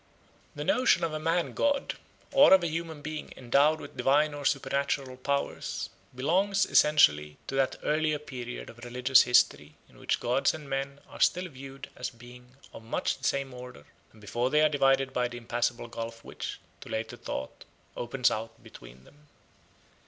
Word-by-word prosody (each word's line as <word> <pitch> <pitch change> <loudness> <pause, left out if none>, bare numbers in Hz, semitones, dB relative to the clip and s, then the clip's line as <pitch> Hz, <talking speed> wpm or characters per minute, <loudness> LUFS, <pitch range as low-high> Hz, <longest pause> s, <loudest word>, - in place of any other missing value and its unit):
The - - -4
notion 255 -8 +3
of 165 -2 -1
a 155 - -2
man 165 +2 0
god, 285 -1 0 0.4
or 275 -7 +8
of 185 - +1
a - - +1
human 160 -2 -5
being 155 0 -6
endowed 140 +5 +3
with 145 - -11
divine 150 +2 +3
or 145 -1 -7
supernatural 140 -1 0
powers, 140 +2 -3 0.2
belongs 190 +9 +2
essentially 75 - +4
to - - -6
that 135 -1 +1
earlier 155 0 +1
period 125 -5 -7
of 120 - -18
religious 125 +2 +4
history 75 -11 +2
in - - -20
which - - 0
gods 125 +5 +1
and 150 -2 -10
men 140 +1 -3
are - - -12
still 180 +1 +3
viewed 135 -1 -10
as - - -4
beings 125 +1 -15 0.2
of - - -10
much 115 - -2
the - - -23
same 140 -1 0
order, 125 -12 -10 0.3
and 110 - -19
before 120 +5 -1
they 150 +2 +3
are 155 - +5
divided 135 -2 +2
by 125 -1 +1
the 120 0 -8
impassable 120 0 -2
gulf 115 0 -7
which, - - -6 0.2
to - - -12
later 110 0 -3
thought, 65 - -6 0.3
opens 120 +1 +1
out 115 +1 -5
between - - -14
them. 150 - -21
135 Hz, 175 wpm, -29 LUFS, 120-150 Hz, 0.4 s, or